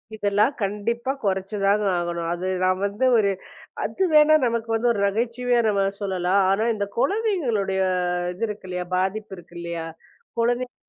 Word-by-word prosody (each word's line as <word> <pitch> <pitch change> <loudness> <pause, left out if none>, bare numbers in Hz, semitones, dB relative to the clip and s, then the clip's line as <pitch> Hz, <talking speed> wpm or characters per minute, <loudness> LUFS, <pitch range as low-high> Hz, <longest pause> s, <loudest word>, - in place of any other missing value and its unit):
இதெல்லாம் 205 +5 +2
கண்டிப்பா 230 +6 -1
குறைச்சுதாங்க 200 +1 +1
ஆகணும். 170 -1 -2
அது 180 +2 -4 0.2
நாம் 185 0 +2
வந்து 205 +6 -1
ஒரு 200 -2 +3 0.5
அது 385 - -1
வேணா 305 0 +7
நமக்கு 230 -1 -1
வந்து 235 +2 +2
ஒரு 205 - -3
நகைச்சுவையா 235 +4 0
நாம 200 -2 +2 0.2
சொல்லலாம். 190 0 +1
ஆனா 205 +4 +2
இந்தக் 200 -1 -4
குழந்தைங்களுடைய 270 - 0 0.5
இது 190 - -6
இருக்கில்லையா, 185 -4 -5
பாதிப்பு 195 +2 -2
இருக்கில்லையா, 170 -1 -6 0.5
குழந்தைங்க 245 +2 0
205 Hz, 130 wpm, -24 LUFS, 190-235 Hz, 0.5 s, வேணா